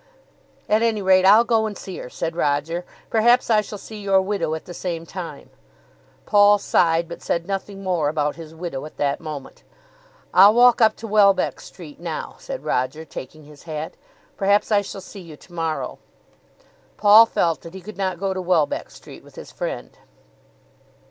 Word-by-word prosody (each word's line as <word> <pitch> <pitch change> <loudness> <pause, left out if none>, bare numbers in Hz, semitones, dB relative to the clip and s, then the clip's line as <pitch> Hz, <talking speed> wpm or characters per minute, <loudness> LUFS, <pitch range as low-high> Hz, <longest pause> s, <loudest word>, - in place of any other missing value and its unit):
"At 215 +1 +2
any 225 -3 0
rate 185 0 +4
I'll 215 +4 +7
go 225 -2 +1
and 205 -3 -7
see 190 - -8
her," - - -8
said 165 +5 -4
Roger. 165 +3 -1 0.3
"Perhaps 240 +2 +3
I 215 -1 +5
shall 210 0 -8
see 215 +1 -10
your 195 -1 +3
widow 190 -5 -1
at 160 - -8
the 175 - -9
same 170 -1 -5
time." 175 0 -8 0.7
Paul 205 0 +5
sighed, 170 -3 +1
but 170 - -9
said 170 0 -2
nothing 195 +1 -5
more 175 -6 0
about 150 -1 -1
his 160 -1 -11
widow 160 -5 -5
at - - -17
that 140 -1 0
moment. 150 -4 -8 0.7
"I'll 200 +3 +7
walk 245 0 +5
up 220 -1 +5
to 225 - -8
Welbeck 200 -3 +3
Street 160 -6 -12
now," 165 -2 -5
said - - -7
Roger, 130 +6 -2
taking 155 +1 -10
his 145 0 -16
hat. 155 +1 -5 0.4
"Perhaps 200 +2 +2
I 205 -1 +4
shall 195 0 -8
see 195 +1 -11
you 160 -4 -12
to 175 - -19
morrow." 165 -2 -3 1.0
Paul 215 +2 +7
felt 165 -6 0
that 165 +2 -11
he 190 - -8
could 215 +4 -10
not 185 -3 -2
go 195 0 -1
to 190 - -4
Welbeck 175 -5 0
Street - - -14
with - - -18
his - - -10
friend. - - -6
185 Hz, 180 wpm, -22 LUFS, 160-205 Hz, 1.0 s, I'll